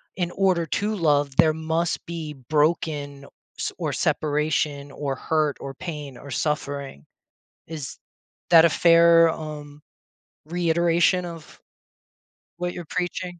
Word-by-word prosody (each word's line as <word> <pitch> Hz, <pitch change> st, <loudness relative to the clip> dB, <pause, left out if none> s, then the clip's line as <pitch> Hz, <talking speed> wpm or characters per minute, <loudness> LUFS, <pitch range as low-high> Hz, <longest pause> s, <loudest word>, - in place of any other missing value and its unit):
in 175 Hz, -2 st, -2 dB
order 185 Hz, -3 st, +1 dB
to 210 Hz, +6 st, -1 dB
love, 145 Hz, -5 st, +1 dB
there 155 Hz, -1 st, +5 dB
must 160 Hz, +2 st, -2 dB
be 160 Hz, -3 st, -5 dB, 0.2 s
broken 150 Hz, -2 st, 0 dB, 0.3 s
s -, -, -2 dB
or -, -, -2 dB
separation 150 Hz, -1 st, -1 dB
or 140 Hz, -2 st, -3 dB
hurt 155 Hz, 0 st, 0 dB
or 135 Hz, 0 st, -7 dB
pain 150 Hz, -6 st, -7 dB
or 140 Hz, -, -11 dB
suffering. 140 Hz, -, -3 dB, 0.6 s
Is 155 Hz, -5 st, -7 dB, 0.5 s
that 165 Hz, -1 st, +8 dB
a 165 Hz, -, +2 dB
fair, 165 Hz, 0 st, +6 dB
um, 150 Hz, -2 st, -8 dB, 0.7 s
reiteration 170 Hz, +1 st, +2 dB
of 165 Hz, -2 st, -11 dB, 1.0 s
what 175 Hz, 0 st, -3 dB
you're 175 Hz, -, -7 dB
preaching? 180 Hz, 0 st, -3 dB
160 Hz, 120 wpm, -24 LUFS, 145-170 Hz, 1.0 s, that